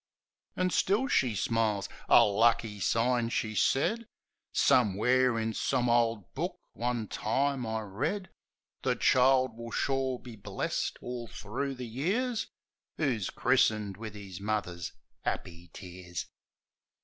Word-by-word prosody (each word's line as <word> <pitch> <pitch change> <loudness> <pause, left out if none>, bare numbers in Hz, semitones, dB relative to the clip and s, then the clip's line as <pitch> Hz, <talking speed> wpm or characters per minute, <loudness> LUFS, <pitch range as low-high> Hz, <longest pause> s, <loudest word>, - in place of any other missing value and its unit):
An' 185 0 +1
still 210 +10 +2
she 125 - +2
smiles. 105 -2 0 0.2
"A - - +8
lucky 110 0 +2
sign," 115 +4 +1
she 110 -2 -1
said. 210 - +1 0.4
"Somewhere, 125 +2 +3
in 110 0 -1
some 125 +1 0
ole 115 -4 +2
book, - - -3 0.2
one 120 -1 -2
time 135 +4 0
I 110 0 -2
read, 140 - -3 0.5
'The - - +1
child 130 -2 +4
will 115 0 -7
sure 135 +1 0
be 120 -2 -11
blest 100 - -3
all 120 -1 -5
thro' 135 +7 -4
the 125 -1 -6
years 210 - -1 0.5
Who's 120 - 0
christened 110 -5 +2
wiv 110 -1 -7
'is 100 -3 -8
mother's 95 -5 -2 0.3
'appy 85 0 -4
tears.' 90 -1 -7
115 Hz, 125 wpm, -30 LUFS, 105-130 Hz, 0.5 s, A